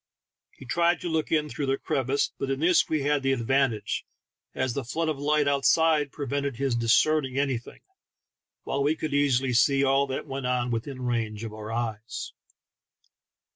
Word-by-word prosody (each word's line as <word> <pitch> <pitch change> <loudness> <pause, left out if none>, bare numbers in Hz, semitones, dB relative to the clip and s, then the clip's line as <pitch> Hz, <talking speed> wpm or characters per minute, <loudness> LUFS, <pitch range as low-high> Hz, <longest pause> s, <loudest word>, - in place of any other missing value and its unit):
He - - -13
tried 170 +6 +2
to 175 - -3
look 160 -2 -1
in 155 -2 +2
through 145 -1 -4
the 135 0 +1
crevice, 135 -2 -1
but 135 - -2
in 135 0 -1
this 170 +3 +3
we. 155 -3 0
had 145 0 +1
the 135 0 +1
advan 135 +2 +2
tage, 110 -2 -4 0.5
as 130 -2 -1
the 140 - -3
flood 160 +7 -2
of 150 -3 -2
light 150 0 +2
outside 145 +1 +3
prevented 140 -1 -3
his 135 0 -1
discerning 130 +4 +2
anything, 135 -4 -2 0.8
while 140 - -2
we 145 +3 +2
could 155 -2 -4
easily 135 -3 +2
see 135 +3 +4
all 135 +1 +3
that 130 - -4
went 135 -2 -4
on 125 -1 0
within 130 +3 -4
range 115 -3 -2
of 110 -2 -6
our 110 0 -7
eyes. 115 -1 -4
135 Hz, 175 wpm, -26 LUFS, 125-145 Hz, 0.8 s, see